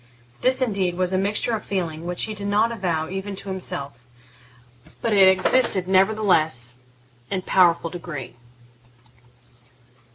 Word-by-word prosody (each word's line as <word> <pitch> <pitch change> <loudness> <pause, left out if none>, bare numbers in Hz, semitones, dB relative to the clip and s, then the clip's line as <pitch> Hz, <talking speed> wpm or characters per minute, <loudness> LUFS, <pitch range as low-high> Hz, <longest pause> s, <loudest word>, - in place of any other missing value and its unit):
This, 260 0 +3
indeed, 195 -7 0
was 185 0 0
a - - +2
mixture 210 +4 -1
of 215 - -6
feeling 170 -4 -4
which 175 0 -1
he 220 - -2
did 205 -1 -5
not 215 +3 +2
avow 175 -8 -2
even 195 +1 -5
to 195 - -7
himself, 140 -9 -5 1.0
but 230 - -1
it 195 -2 +6
existed, 190 0 +3
nevertheless, 185 - +2 0.5
in 195 - -1
a - - -26
powerful 170 -3 +3
degree. 165 -6 -7
190 Hz, 135 wpm, -23 LUFS, 170-205 Hz, 1.0 s, it